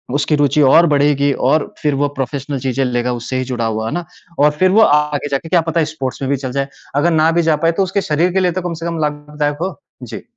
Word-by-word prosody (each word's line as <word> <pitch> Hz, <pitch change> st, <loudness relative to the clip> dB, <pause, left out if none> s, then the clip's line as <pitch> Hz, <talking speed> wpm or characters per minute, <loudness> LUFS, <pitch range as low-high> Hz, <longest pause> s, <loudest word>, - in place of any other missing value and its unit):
उसकी 150 Hz, +1 st, +1 dB
रुचि 145 Hz, +1 st, +2 dB
और 170 Hz, +1 st, +6 dB
बढ़ेगी 145 Hz, -1 st, +2 dB, 0.2 s
और 155 Hz, 0 st, 0 dB
फिर 150 Hz, -2 st, +1 dB
वो 145 Hz, +1 st, +1 dB
प्रोफ़ेशनल 140 Hz, +1 st, -3 dB
चीज़ें 130 Hz, +1 st, -1 dB
लेगा 125 Hz, 0 st, -1 dB
उससे 120 Hz, +2 st, -4 dB
ही 130 Hz, -, -1 dB
जुड़ा 120 Hz, -3 st, -3 dB
हुआ 110 Hz, 0 st, -2 dB
है -, -, -3 dB
ना? 175 Hz, -1 st, -3 dB, 0.3 s
और 150 Hz, +1 st, +5 dB
फिर 185 Hz, 0 st, +4 dB
वो 220 Hz, +3 st, +5 dB
आगे 150 Hz, -2 st, +1 dB
जाके 140 Hz, +4 st, -2 dB
क्या 175 Hz, -2 st, +3 dB
पता 165 Hz, +1 st, -1 dB
है 155 Hz, -, +2 dB
स्पोर्ट्स 140 Hz, -4 st, -5 dB
में 135 Hz, -, -2 dB
भी 140 Hz, -, +1 dB
चल 130 Hz, -1 st, -5 dB
जाए। 135 Hz, +1 st, -2 dB, 0.3 s
अगर 165 Hz, +4 st, +2 dB
ना 160 Hz, +1 st, +3 dB
भी 170 Hz, +1 st, +2 dB
जा 160 Hz, -1 st, +3 dB
पाए 165 Hz, +2 st, +2 dB
तो 195 Hz, +3 st, 0 dB
उसके 190 Hz, +2 st, -1 dB
शरीर 170 Hz, +2 st, 0 dB
के 190 Hz, -, +2 dB
लिए 180 Hz, -1 st, +2 dB
तो 185 Hz, +2 st, -3 dB
कम 175 Hz, -1 st, -4 dB
से -, -, -4 dB
कम 165 Hz, -1 st, -3 dB
लाभदायक 150 Hz, 0 st, -2 dB
हो। 190 Hz, +1 st, -3 dB, 0.3 s
जी। -, -, -8 dB
150 Hz, 265 wpm, -17 LUFS, 135-165 Hz, 0.3 s, और